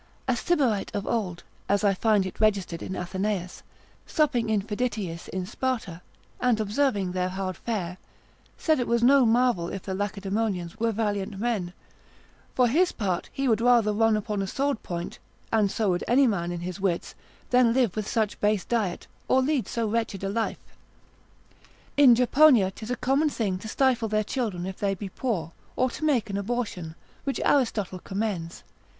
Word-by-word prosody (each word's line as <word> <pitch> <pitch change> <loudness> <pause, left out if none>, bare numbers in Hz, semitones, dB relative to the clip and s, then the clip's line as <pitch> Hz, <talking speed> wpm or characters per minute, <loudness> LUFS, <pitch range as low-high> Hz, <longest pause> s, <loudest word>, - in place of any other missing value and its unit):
A 255 - +2
Sybarite 245 - +1
of 200 - -2
old, 190 -7 -2 0.3
as 200 +1 +2
I 200 -1 +4
find 210 0 +2
it 185 - -7
registered 200 -6 +1
in 190 - -5
Athenaeus, 185 0 -3 0.5
supping 275 -7 +1
in 210 -3 +1
Phiditiis 210 -6 -3
in 185 -1 -3
Sparta, 220 -6 -3 0.4
and 250 -3 +2
observing 210 -3 0
their 180 0 -1
hard 185 0 -3
fare, 185 -4 -4 0.6
said 315 -4 +2
it 245 - -1
was 235 0 +1
no 265 0 +6
marvel 230 -7 +2
if 195 - -6
the 190 - -4
Lacedaemonians 200 -1 -2
were 230 0 +1
valiant 205 -2 -2
men; 210 -5 -1 0.8
for 250 -1 +4
his 345 +9 +3
part, 185 -5 -2
he 275 0 -1
would 225 -2 +2
rather 235 -3 +4
run 225 0 +3
upon 210 -1 -2
a 195 - -2
sword 275 +3 -1
point 175 0 -5 0.3
(and 215 -3 +3
so 210 -1 0
would 175 - -1
any 265 +3 +5
man 175 -7 0
in 175 -1 -4
his 180 +2 -5
wits,) 190 -3 -1 0.4
than 250 -2 +5
live 240 -6 +2
with 215 -1 -3
such 220 -3 -1
base 210 -3 +2
diet, 215 -7 -1 0.2
or 260 - +4
lead 280 -2 0
so 230 -1 -1
wretched 215 -3 -2
a 195 - -1
life. 225 +2 -1 1.4
In 275 -4 +7
Japonia, 250 -4 +5
'tis 220 +3 -9
a 250 - 0
common 270 +5 +2
thing 200 -9 -2
to 220 - -8
stifle 245 -1 +2
their 215 0 +1
children 210 -7 -3
if 190 0 -6
they 200 -1 0
be 195 +1 -6
poor, 185 - -2 0.2
or 255 -1 +1
to 310 - -7
make 275 -8 +2
an 195 - -2
abortion, 200 -7 -3 0.3
which 275 - -2
Aristotle 215 -9 +1
commends. 190 -3 -4
215 Hz, 175 wpm, -26 LUFS, 190-240 Hz, 1.4 s, In